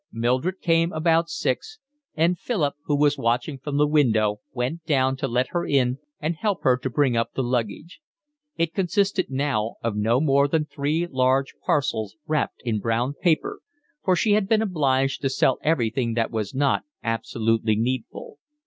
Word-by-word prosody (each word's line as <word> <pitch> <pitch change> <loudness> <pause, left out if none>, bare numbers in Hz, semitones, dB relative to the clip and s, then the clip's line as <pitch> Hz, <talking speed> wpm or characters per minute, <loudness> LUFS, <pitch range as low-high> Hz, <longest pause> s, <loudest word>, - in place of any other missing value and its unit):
Mildred 130 +11 -1
came 165 0 +2
about 165 +1 +2
six, 130 - -2 0.4
and 165 +2 +2
Philip, 165 - -1
who 145 - +1
was 145 0 +2
watching 120 +5 0
from 145 0 -3
the 150 - +4
window, 110 -9 +2
went 130 +7 -3
down 135 -3 +2
to 135 - -2
let 125 +1 0
her 175 -1 -1
in 130 -2 +1 0.2
and 160 +3 -2
help 205 +1 -1
her 130 -3 +5
to 130 +1 -4
bring 130 -1 +2
up 115 0 -1
the 135 - 0
luggage: 125 - -3 0.6
it 165 0 0
consisted 195 0 0
now 130 -5 -1
of 115 -2 -1
no 110 +4 +2
more 140 -1 +3
than 150 +1 0
three 150 +3 -1
large 130 -2 +1
parcels 110 -7 0
wrapped 155 -2 -2
in 110 -3 0
brown 115 +5 0
paper, 175 - 0 0.4
for 185 - +3
she 210 +4 +1
had 205 -1 +3
been 220 -1 +3
obliged 135 -8 +1
to 135 - +1
sell 130 0 +2
everything 120 -5 0
that 115 -1 0
was 110 -1 -3
not 140 0 +2 0.2
absolutely 115 -1 0
needful. 130 - -3
135 Hz, 170 wpm, -24 LUFS, 120-165 Hz, 0.6 s, her